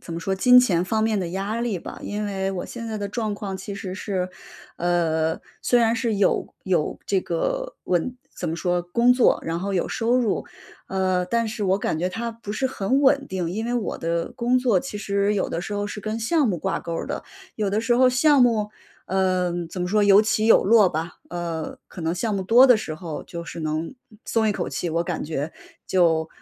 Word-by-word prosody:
怎 165 - -7
么 - - -3
说， 190 +2 -1
金 250 +5 +7
钱 180 -9 +3
方 220 +3 0
面 220 -2 +1
的 180 -3 -2
压 200 +5 -3
力 225 -6 -1
吧。 - - -9
因 210 +1 -3
为 195 -1 -2
我 185 -2 -4
现 230 -1 -7
在 220 - -3
的 205 -1 -3
状 215 0 -2
况 200 -2 -5
其 200 +2 -7
实 190 -2 -6
是 190 -2 -2 0.5
呃， 165 -2 +1 0.2
虽 245 - +3
然 230 -1 +3
是 230 -1 0
有 200 -1 +1
有 175 -5 0
这 195 -2 +2
个 - - -2
稳 180 +8 0 0.2
怎 175 - -4
么 160 - -2
说， 175 0 0
工 235 +8 +3
作， 250 -1 +4
然 165 +1 -2
后 200 +1 -2
有 180 - +1
收 235 +2 +1
入， 235 -5 0 0.4
呃， 185 -1 0
但 230 +4 0
是 215 0 -4
我 190 0 +2
感 160 - -1
觉 180 +3 0
它 230 +5 -4
不 225 -2 -9
是 265 +4 0
很 260 +2 0
稳 280 +1 +4
定。 180 -6 -3
因 220 +5 -3
为 240 - -1
我 235 -4 -2
的 165 0 -2
工 245 +2 +1
作 240 -7 +2
其 270 - -6
实 200 0 0
有 195 - -1
的 165 - -2
时 200 +3 -5
候 205 0 -1
是 205 +1 -6
跟 215 +2 -3
项 275 +4 +2
目 185 - 0
挂 - - -2
钩 170 - -5
儿 - - -3
的， - - -4 0.3
有 210 -2 0
的 200 +2 0
时 235 +1 +2
候 255 +1 +5
项 270 +2 +4
目 220 -4 +2 0.4
嗯， 180 -2 0
怎 180 - -6
么 - - -1
说， 210 +1 +3
有 200 0 +7
起 215 0 +1
有 225 - +6
落 210 -2 +6
吧。 160 +2 -4
呃， 170 -2 -4
可 - - -10
能 165 +1 -1
项 210 +4 -1
目 195 - -1
多 235 +7 +7
的 250 - +7
时 160 -7 -5
候 160 -1 -6
就 170 -1 -7
是 170 - -7
能， 155 +1 -2 0.2
呃， 215 - -17
松 220 -1 +1
一 210 - +2
口 - - -3
气， 145 +5 -3
我 165 +1 +1
感 175 -2 -3
觉 150 0 -3 0.3
就， 165 -3 +2
200 Hz, 250 characters per minute, -24 LUFS, 175-230 Hz, 0.5 s, 金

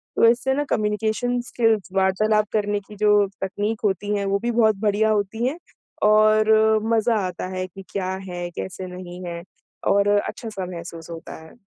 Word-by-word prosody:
तो - - +5
इससे 240 +3 +2
ना 290 +2 0
कम्युनिकेशन 220 +3 0
स्किल्स 220 -4 +1
वार्तालाप 210 +3 +2
करने 205 -1 +1
की 210 - -11
जो 210 -1 +4 0.2
तकनीक 205 +3 -2
होती 205 +1 0
हैं 200 - -2
वो 195 0 +1
भी 240 +2 -1
बहुत 220 -2 +3
बढ़िया 215 0 +2
होती 215 +3 0
हैं 285 +5 -2 0.5
और 215 0 +5 0.4
मज़ा 225 +1 +2
आता 180 0 -5
है 185 0 -2
कि 195 +2 -12
क्या 190 -2 -2 0.2
है, 175 -1 -4
कैसे 185 +1 -6
नहीं 180 0 -8
है 170 -1 -5 0.5
और 200 0 +3
अच्छा-सा 210 -2 -4
महसूस 170 -2 -8
होता 165 -1 -8
है। 160 - -15
205 Hz, 170 wpm, -23 LUFS, 185-220 Hz, 0.5 s, तो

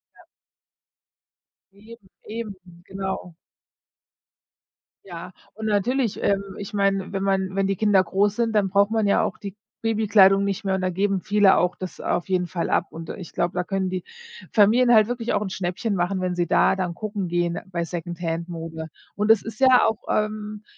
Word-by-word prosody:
Ja. - - -20 1.5
Eben. 215 +1 -15 0.2
Eben, 220 -2 -6 0.3
genau. 190 -3 -5 1.7
Ja, 175 0 -8 0.2
und 220 +1 -5
natürlich, 220 +3 0
ähm, 200 -1 +2 0.2
ich 200 - -7
meine, 195 -1 0
wenn 195 - -2
man 190 -1 0
wenn 195 0 +1
die 195 - 0
Kinder 200 -1 +3
groß 195 +4 0
sind, 230 -2 0
dann 200 -2 +2
braucht 200 +1 +3
man 220 -1 +1
ja 200 - +3
auch - - -2
die 200 -2 -8 0.3
Babykleidung 205 -3 +4
nicht 200 +1 -2
mehr 190 - +1
und 190 - -1
da 185 - 0
geben 195 +1 0
viele 205 -1 +4
auch 180 0 +1
das 185 -1 -8
auf 175 - -1
jeden 180 -2 0
Fall 170 0 -3
ab. - - +1
Und 165 0 -9
ich 185 -4 -9
glaube, 175 - -1
da 180 - -1
können 190 0 -2
die 185 -1 -3 0.5
Familien 235 +4 +5
halt 215 - +6
wirklich 240 -1 -2
auch - - +1
'n 190 - -5
Schnäppchen 190 +4 -2
machen, 185 +1 -1
wenn 180 -1 -1
sie 175 -1 -1
da - - +3
dann 180 -3 -3
gucken 205 -3 -4
gehen 175 0 -1
bei 175 -2 -3
Secondhand-Mode. 165 -1 -5 0.2
Und 210 +1 -1
das 225 -2 +5
ist 225 +1 -8
ja 260 -1 +6
auch, 220 -1 0
ähm, 215 0 -2
195 Hz, 180 wpm, -23 LUFS, 180-210 Hz, 1.7 s, halt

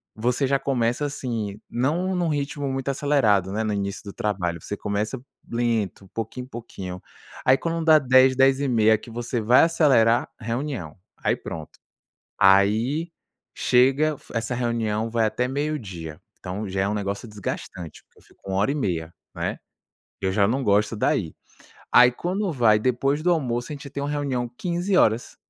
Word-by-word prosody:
você 125 +5 0
já 135 0 +2
começa 120 +1 0
assim, 115 -8 -4
não 170 +10 0
num 175 -1 0
ritmo 145 -1 -2
muito 135 +1 -3
acelerado, 120 -10 +2
né, 110 - -1
no 110 - -1
início 100 -1 -3
do 100 - -7
trabalho, 95 -7 -2
você 105 - -5
começa 105 +4 -2 0.3
lento, 115 -5 -1
pouquinho 115 +3 -4
em - - -18
pouquinho, 95 -7 -7 0.4
aí 130 +1 +6
quando 165 +2 -2
dá 160 -1 +7
10:00h, 130 -1 +5
10:30h 130 -5 +4
que 115 - -13
você 120 +1 -3
vai 120 +4 +5
acelerar, 135 -9 +3
reunião, 115 - -4 0.2
aí - - 0
pronto. 80 -2 -9 0.6
Aí 110 - +3 0.4
chega 135 +5 +3 0.2
essa 115 +2 -2
reunião 115 -2 -1
vai 115 -1 +1
até 125 +4 -1
12:00h, 110 - -4 0.2
então 100 +3 -5
já 95 0 -1
é 100 - +1
um 105 - -1
negócio 100 +2 -3
desgastante 95 -5 -7
porque - - -29
eu - - -23
fico - - -25
uma 95 - 0
hora 105 +7 +2
e - - -3
meia, 85 - -2 0.2
né. - - -2 0.6
Eu 95 - 0
já 100 0 +3
não 135 +4 0
gosto 105 +1 +2
daí. - - 0 0.6
Aí 125 0 +7
quando 185 +6 -2
vai 115 -6 +4
depois 135 +5 0
do 180 - +2
almoço, 125 -4 -1
a - - -4
gente 140 -1 -9
tem 140 - -5
uma 140 - -2
reunião 135 -5 -1
15:00h. 175 - +1
120 Hz, 165 wpm, -24 LUFS, 105-140 Hz, 0.6 s, dá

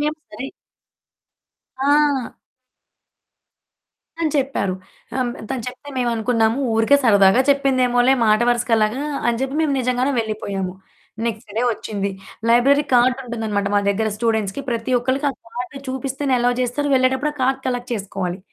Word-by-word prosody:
మేము 300 +1 -1
సరే 220 +6 -7 1.3
ఆ! 285 -2 +2 1.9
అని 315 -2 +1
చెప్పారు. 260 -9 0 0.4
ఆహ్, 260 - +1
హ్మ్, 240 - -2 0.2
తను 250 -3 -2
చెప్తే 255 +3 -11
మేవనుకున్నాము 230 -1 +1 0.2
ఊరికే 225 +6 +4
సరదాగా 200 +1 +5
చెప్పిందేమోలే 255 -2 +3
మాట 215 +1 +4
వరసకలాగా 230 0 +1 0.3
అని 235 -1 +1
జెప్పి 270 +2 -2
మేము 305 -3 +1
నిజంగానే 255 +2 0
వెళ్ళిపోయాము. 200 -4 -3 0.5
నెక్స్ట్ 220 -2 -5
డే 230 - +1
ఒచ్చింది. 200 -2 -4 0.4
లైబ్రరీ 275 +5 +4
కార్డుంటుందనమాట 235 -5 +1
మా 205 - +4
దగ్గర 215 +2 +1
స్టూడెంట్స్‌కి 220 -1 -1
ప్రతి 230 +1 -2
ఒక్కళ్ళకి, 260 +4 -1
ఆ - - -7 0.2
కార్డ్ 250 +3 -5
చూపిస్తేనే 265 +1 -2
ఎలోవ్ 245 0 +1
జేస్తారు. 270 +4 -1
వెళ్ళేటప్పుడు 265 +3 +2
ఆ - - -19
కార్డ్ 265 +1 +1
కలెక్ట్ 245 -1 -3
చేసుకోవాలి. 190 -3 -4
245 Hz, 130 wpm, -21 LUFS, 220-265 Hz, 1.9 s, సరదాగా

